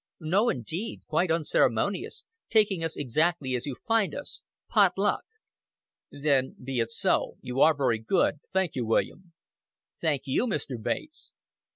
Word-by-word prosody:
"No, 190 Hz, +8 st, +2 dB
indeed. 165 Hz, -, -3 dB
Quite 180 Hz, -, +1 dB
unceremonious 165 Hz, -2 st, +1 dB, 0.3 s
taking 210 Hz, -6 st, +3 dB
us 165 Hz, -1 st, -2 dB
exactly 145 Hz, +1 st, 0 dB
as 125 Hz, +3 st, -2 dB
you 135 Hz, -, -3 dB
find 225 Hz, -3 st, +2 dB
us 290 Hz, -, -6 dB, 0.3 s
pot -, -, +4 dB
luck." -, -, +2 dB, 0.9 s
"Then 140 Hz, -2 st, +1 dB
be 130 Hz, -1 st, -2 dB
it 115 Hz, -1 st, 0 dB
so. 115 Hz, -, 0 dB
You 125 Hz, +1 st, -4 dB
are 155 Hz, -2 st, +6 dB
very 125 Hz, -5 st, +1 dB
good. 150 Hz, -, +1 dB
Thank 190 Hz, -3 st, +1 dB
you, 125 Hz, -, -2 dB
William." 170 Hz, +10 st, -1 dB, 0.7 s
"Thank 150 Hz, -5 st, 0 dB
you, 145 Hz, -, +1 dB
Mr. 140 Hz, -, -3 dB
Bates." 310 Hz, -, -4 dB
155 Hz, 145 wpm, -28 LUFS, 130-185 Hz, 0.9 s, are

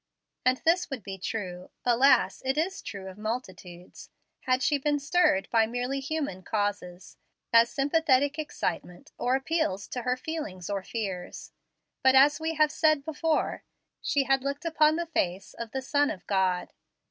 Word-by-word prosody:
And 255 Hz, 0 st, +3 dB
this 350 Hz, +2 st, +3 dB
would 265 Hz, -7 st, -5 dB
be 190 Hz, 0 st, -7 dB
true 180 Hz, -3 st, -5 dB, 0.2 s
alas, 250 Hz, +3 st, +4 dB
it 265 Hz, +2 st, 0 dB
is 365 Hz, +5 st, -1 dB
true 200 Hz, -3 st, -7 dB
of 190 Hz, +2 st, -10 dB
multitudes 190 Hz, -6 st, -7 dB, 0.4 s
had 255 Hz, 0 st, +2 dB
she 290 Hz, -2 st, +2 dB
been 290 Hz, +1 st, +1 dB
stirred 280 Hz, -, +2 dB
by 225 Hz, -1 st, +4 dB
merely 245 Hz, +4 st, -2 dB
human 275 Hz, -9 st, -3 dB
causes, 195 Hz, -3 st, -3 dB, 0.4 s
as 230 Hz, 0 st, +6 dB
sympathetic 285 Hz, 0 st, +2 dB
excitement, 180 Hz, -, -4 dB
or 250 Hz, +1 st, +2 dB
appeals 270 Hz, -, -1 dB
to 250 Hz, -, -4 dB
her 250 Hz, +1 st, 0 dB
feelings 255 Hz, -, -5 dB
or 200 Hz, -1 st, -1 dB
fears. 190 Hz, -4 st, -5 dB, 0.5 s
But, 265 Hz, -1 st, +5 dB
as 285 Hz, +3 st, +6 dB
we 320 Hz, 0 st, -2 dB
have 305 Hz, -1 st, +3 dB
said 310 Hz, -2 st, +2 dB
before, 320 Hz, 0 st, -1 dB, 0.4 s
she 280 Hz, -, +1 dB
had 270 Hz, -1 st, +1 dB
looked 280 Hz, +3 st, -3 dB
upon 310 Hz, -2 st, +3 dB
the 340 Hz, +1 st, -2 dB
face 195 Hz, -, -2 dB
of 235 Hz, -1 st, -7 dB
the 265 Hz, +3 st, -4 dB
Son 285 Hz, +2 st, +2 dB
of 185 Hz, -1 st, -6 dB
God. 185 Hz, -2 st, 0 dB
260 Hz, 160 wpm, -28 LUFS, 195-295 Hz, 0.5 s, as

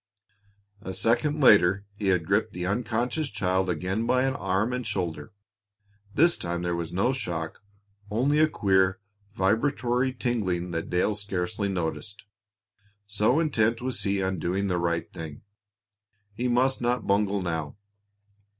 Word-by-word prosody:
A 95 Hz, -3 st, -6 dB
second 145 Hz, +7 st, +1 dB
later 100 Hz, -5 st, +5 dB
he 100 Hz, 0 st, -4 dB
had 90 Hz, -4 st, +2 dB
gripped 105 Hz, +4 st, +1 dB
the 90 Hz, 0 st, -4 dB
unconscious 120 Hz, -, -1 dB
child 95 Hz, -2 st, 0 dB
again 95 Hz, +7 st, -1 dB
by 130 Hz, 0 st, +3 dB
an 135 Hz, 0 st, 0 dB
arm 100 Hz, 0 st, 0 dB
and 125 Hz, 0 st, -2 dB
shoulder. 85 Hz, -8 st, -3 dB, 0.8 s
This 170 Hz, +3 st, +4 dB
time 85 Hz, 0 st, -3 dB
there 85 Hz, -1 st, -1 dB
was 85 Hz, -1 st, -4 dB
no 100 Hz, +9 st, +1 dB
shock, 80 Hz, -10 st, -4 dB, 0.5 s
only 130 Hz, +8 st, +2 dB
a 155 Hz, 0 st, +5 dB
queer, 95 Hz, -5 st, +2 dB, 0.4 s
vibratory 125 Hz, +5 st, +1 dB
tingling 100 Hz, -9 st, -2 dB
that 85 Hz, -1 st, -3 dB
Dale 90 Hz, +4 st, +1 dB
scarcely 100 Hz, -1 st, -3 dB
noticed, 95 Hz, +3 st, -4 dB, 0.8 s
so 105 Hz, +7 st, +2 dB
intent 115 Hz, -8 st, +1 dB
was 125 Hz, -1 st, -3 dB
he 100 Hz, -1 st, 0 dB
on 95 Hz, -1 st, -1 dB
doing 95 Hz, +5 st, -1 dB
the 90 Hz, -1 st, 0 dB
right 85 Hz, -1 st, 0 dB
thing. 80 Hz, -1 st, -8 dB, 0.9 s
He 120 Hz, +4 st, -2 dB
must 125 Hz, +2 st, +2 dB
not 120 Hz, -1 st, 0 dB
bungle 100 Hz, -1 st, +1 dB
now. 80 Hz, -1 st, -3 dB
100 Hz, 140 wpm, -27 LUFS, 90-120 Hz, 0.9 s, later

